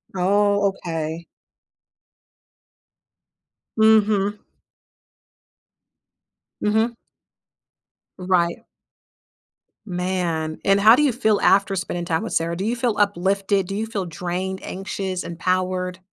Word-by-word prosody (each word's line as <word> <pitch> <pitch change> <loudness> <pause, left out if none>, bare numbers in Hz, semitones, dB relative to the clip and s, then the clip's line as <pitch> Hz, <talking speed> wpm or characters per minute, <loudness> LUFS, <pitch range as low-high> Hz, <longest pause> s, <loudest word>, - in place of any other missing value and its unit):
Oh, 200 +2 +2
okay. 165 -3 -5 2.5
Mhm. 210 -2 +3 2.2
Mhm. 220 +3 +1 1.2
Right. 180 -2 +1 1.3
Man. 175 -4 -2
And, 195 0 +4
how 220 +3 +8
do 300 - +2
you 280 - +3
feel 220 -4 +1
after 195 0 +3
spending 175 -2 -3
time 165 +3 -1
with 225 - -5
Sarah? 170 +1 0
Do 190 - -3
you 230 +2 0
feel 240 -3 -1
uplifted? 195 -1 +1
Do 195 - -4
you 220 +2 -2
feel 205 -4 -4
drained, 180 +3 -4
anxious, 190 -1 -4
empowered? 185 +1 -2
190 Hz, 95 wpm, -22 LUFS, 180-205 Hz, 2.5 s, how